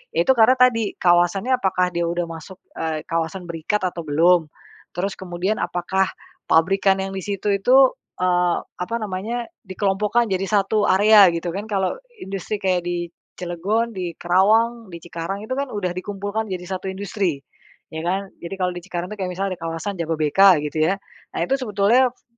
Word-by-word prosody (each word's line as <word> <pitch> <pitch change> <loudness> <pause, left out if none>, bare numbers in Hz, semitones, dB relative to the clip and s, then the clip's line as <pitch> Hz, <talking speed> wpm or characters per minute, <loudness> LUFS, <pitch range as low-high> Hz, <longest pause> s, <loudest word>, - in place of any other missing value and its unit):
ya - - +1
itu 265 - +5
karena 235 +1 +5
tadi, 230 -5 +3
kawasan 175 +3 +3
nya 255 -1 +3
apakah 185 -1 +1
dia 170 0 0
udah 175 0 -1
masuk, 165 +3 -9 0.2
eee, 160 -1 -3
kawasan 165 +2 -2
berikat 170 +5 -2
atau 175 -1 -3
belum. 165 +2 +3 0.5
Terus 195 +2 -1
kemudian 185 +3 -2
apakah 190 +1 0 0.4
pabrikan 195 +4 +3
yang 195 0 -4
di 190 - -3
situ 200 +1 -3
itu 200 +6 +3 0.4
eee, 180 -1 +2
apa 180 +6 -5
namanya 215 +4 -3 0.2
dikelompokkan 205 +3 0
jadi 190 0 0
satu 205 0 +2
area 205 0 +7
gitu 170 +1 -3
kan. 200 +2 -4
Kalau 195 -2 0 0.2
industri 195 - -4
kayak 185 -2 +1
di 175 -1 -2 0.3
Cilegon, 200 +7 -1
di 175 -3 -4
Karawang, 220 +5 +2
di 170 - -8
Cikarang 175 +4 -5
itu 255 - -3
kan 280 0 -2
udah 190 -4 -2
dikumpulkan 205 +3 -3
jadi 180 -1 -5
satu 190 +1 -4
industri, 190 -5 -2 0.5
ya 160 - -4
kan? 190 +2 -1
Jadi 170 +3 -6
kalau 180 -1 +1
di 175 - -7
Cikarang 175 -1 -4
itu - - -9
kayak 185 -1 -2
misalnya 195 0 -1
di - - -33
kawasan 165 +4 -4
Jababeka 165 +4 +4
gitu 155 +1 -2
ya, - - 0 0.4
nah - - -3
itu 270 - +1
sebetulnya 225 +3 +3
fu - - -37
190 Hz, 175 wpm, -22 LUFS, 175-205 Hz, 0.5 s, area